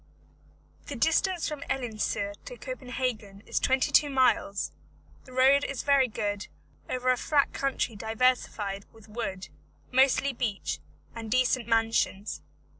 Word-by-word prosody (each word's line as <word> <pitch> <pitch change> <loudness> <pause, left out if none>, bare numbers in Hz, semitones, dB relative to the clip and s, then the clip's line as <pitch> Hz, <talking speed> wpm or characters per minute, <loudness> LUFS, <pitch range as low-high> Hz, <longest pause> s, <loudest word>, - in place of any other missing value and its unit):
The 285 - -5
distance 325 +7 +2
from 300 -2 -5
Elsineur 215 -5 -1
to - - -8
Copenhagen 250 - -4
is - - 0
twenty 265 0 +2
two 295 - +5
miles; 255 -7 +2 0.5
the 255 - -14
road 265 +2 +5
is 275 - -3
very 280 -2 +4
good, 205 -3 -3 0.4
over 255 0 +1
a 250 - +2
flat 285 +2 +2
country 270 -4 -1
diversified 220 -3 0
with 225 -1 -17
wood, 210 -4 -5 0.4
mostly 265 +1 +4
beech, 230 -5 -2 0.3
and 225 -1 -7
decent 255 0 +2
mansions. 225 -3 +1
250 Hz, 125 wpm, -28 LUFS, 215-270 Hz, 0.5 s, two